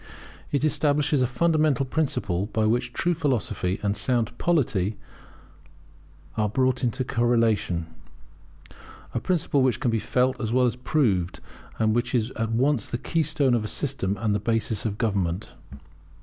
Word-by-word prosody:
It 140 +1 +1
establishes 145 -1 +2
a 125 - +3
fundamental 155 -1 +2
principle 125 - -1
by 110 0 0
which 125 +3 +1
true 175 +8 0
philosophy 120 - -1
and 100 0 +1
sound 120 -2 0
polity 110 - +1 1.4
are 105 -1 +1
brought 130 +3 +1
into 130 +2 0
correlation; 115 -8 +1 1.3
a - - 0
principle 165 -6 +1
which 130 -1 +2
can 125 -5 0
be 115 - +1
felt 130 +4 0
as 110 -2 -2
well 125 +1 +3
as 120 -2 0
proved, 120 - 0 0.4
and 110 -1 +2
which 120 +2 0
is 115 +1 0
at 115 0 -3
once 130 0 +1
the 120 - -3
keystone 145 -2 +1
of 115 -3 +1
a - - -3
system 105 -7 -1
and 105 -2 +1
a - - 0
basis 115 -1 -1
of 105 -1 -4
government. 100 -4 -1
120 Hz, 150 wpm, -25 LUFS, 110-135 Hz, 1.4 s, a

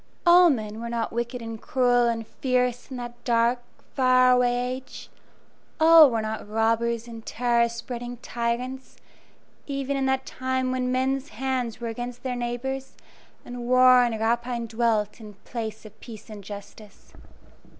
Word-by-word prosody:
All 350 0 +7
men 215 -6 -2
were 235 0 -5
not 235 -1 -2
wicked 235 +1 -3
and 225 -1 -7
cruel 245 -2 +2
and 230 -1 -2
fierce 250 0 -1
in 260 - -6
that 240 0 -8
dark, 235 +1 +2 0.3
far 255 -1 +4
away 250 0 +1
age; 260 - -12 0.7
all 320 -2 +8
were 225 -2 -1
not 215 -1 -5
robbers 230 +1 0
and 230 -1 -9
terror 235 0 +1
spreading 240 +1 -6
tyrants, 245 +3 -4 0.7
even 275 -1 -2
in 270 -1 0
that 265 0 0
time 260 0 -2
when 255 -1 -1
men's 265 +2 -1
hands 250 -1 -3
were 235 - -4
against 240 +2 -6
their 255 -1 -2
neighbors, 255 +3 -4 0.5
and 245 -1 -7
war 255 0 +6
and 230 -2 -1
rapine 235 +1 -1
dwelt 225 -2 -1
in 210 -2 -11
place 220 -2 -6
of 215 - -14
peace 220 -2 -11
and 205 -2 -9
justice. 205 +1 -12
240 Hz, 150 wpm, -25 LUFS, 230-255 Hz, 0.7 s, all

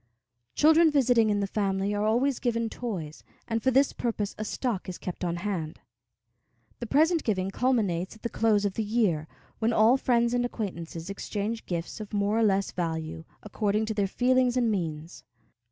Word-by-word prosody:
Children 320 +2 +6
visiting 245 -6 +3
in 205 -1 +1
the - - +1
family 195 0 -1
are 205 +1 0
always 250 +5 +1
given 230 -2 -1
toys, 180 -11 -5 0.2
and 225 -1 -1
for 260 - +2
this 270 +2 +3
purpose 215 -4 -2
a 215 - -4
stock 215 -3 -3
is 180 - -6
kept 180 0 -6
on 170 -1 -1
hand. 175 -4 -4 1.0
The 240 - -5
present 320 +6 +3
giving 195 -3 -1
culminates 200 -7 0
at 220 - -19
the - - 0
close 215 -3 +2
of 200 - 0
the 220 - -2
year, 205 -8 0 0.3
when 225 +1 +1
all 225 +4 +5
friends 235 -2 +2
and 245 0 +1
acquaintances 175 -7 -5
exchange 210 +3 -4
gifts 170 +2 -4
of 215 0 -6
more 205 +2 +1
or - - +3
less 195 -2 +2
value, 160 -2 -4 0.2
according 210 0 0
to 220 - -2
their 205 -2 0
feelings 250 +3 +2
and 235 -3 +2
means. 165 -4 -4
215 Hz, 180 wpm, -27 LUFS, 190-240 Hz, 1.0 s, Children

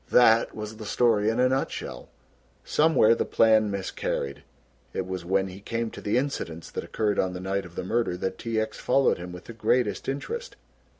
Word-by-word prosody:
That 115 -2 +5
was 105 0 -6
the 110 - -8
story 110 -1 +3
in 115 +2 0
a 125 - +5
nutshell. 130 - -3 0.6
Somewhere 150 -8 +4
the - - 0
plan 110 -1 +4
miscarried. 75 -7 -3 0.5
It 95 - -2
was 95 -1 -4
when 95 +2 +1
he 95 +1 -9
came 115 +1 -3
to - - -9
the 105 +3 +1
incidents 105 - -3
that - - -4
occurred 105 -2 -1
on 95 -1 +1
the 90 - -5
night 95 +1 -2
of 85 -1 -13
the - - -3
murder 110 -2 0
that 95 +1 -3
T. 115 -1 -1
X. 110 0 -3
followed 135 -6 +2
him 90 0 -7
with 90 0 -9
the 115 - -9
greatest 115 -1 0
interest. 470 - -4
110 Hz, 195 wpm, -26 LUFS, 95-115 Hz, 0.6 s, That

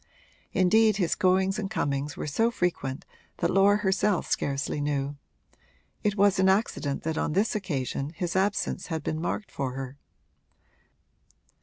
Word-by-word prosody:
Indeed 215 +3 +4
his 175 -5 +1
goings 190 +1 +2
and 200 -2 -3
comings 145 -7 -2
were - - -4
so 225 +11 +2
frequent 175 - -2 0.3
that - - 0
Laura 200 +2 +5
herself 195 -1 +1
scarcely 140 +1 -1
knew: 145 -1 -1 0.9
it 205 -1 +1
was 200 -1 +4
an 190 0 +5
accident 190 -8 0
that 160 0 -1
on - - -1
this 200 +6 +2
occasion 140 -8 -2
his 175 0 -3
absence 195 0 0
had 160 -3 -3
been 155 +1 -2
marked 200 +4 -3
for 135 -2 -3
her. 135 +1 -6
180 Hz, 145 wpm, -27 LUFS, 145-200 Hz, 0.9 s, Laura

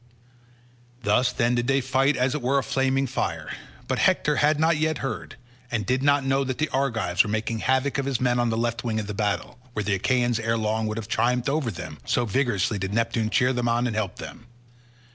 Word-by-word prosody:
Thus 125 +5 +3
then 120 0 +1
did 120 0 0
they 135 0 +3
fight 135 +2 +1
as 130 +1 +1
it 150 - -3
were 130 +3 +1
a 135 - +1
flaming 135 0 +1
fire. 130 - -3 0.3
But - - -1
Hector 150 -1 +2
had 150 0 +3
not 160 0 +3
yet 155 0 0
heard, 120 -5 -5 0.3
and 115 -5 -2
did 130 +5 +1
not 140 0 +3
know 135 +1 +2
that 130 -1 -3
the 155 - 0
Argives 115 -10 +1
were - - -5
making 110 +1 -2
havoc 130 +3 +1
of 135 - -2
his 135 -4 0
men 125 -1 +1
on 120 -1 +2
the 115 - -1
left 115 0 -1
wing 110 -3 -1
of 105 - -3
the 105 - -5
battle, 105 +4 -2
where 105 - -2
the 100 0 0
Achaeans 120 +3 +1
ere 115 0 0
long 110 0 -1
would 110 +1 -3
have 110 -2 -5
triumphed 125 +3 +1
over 145 -3 0
them, 90 -6 -7
so 120 - 0
vigorously 110 -4 0
did 95 +2 -3
Neptune 115 -1 0
cheer 125 +2 +2
them 120 -1 0
on 120 +1 +1
and 115 -3 -2
help 105 -4 -2
them. 120 - -10
120 Hz, 225 wpm, -25 LUFS, 110-135 Hz, 0.3 s, Thus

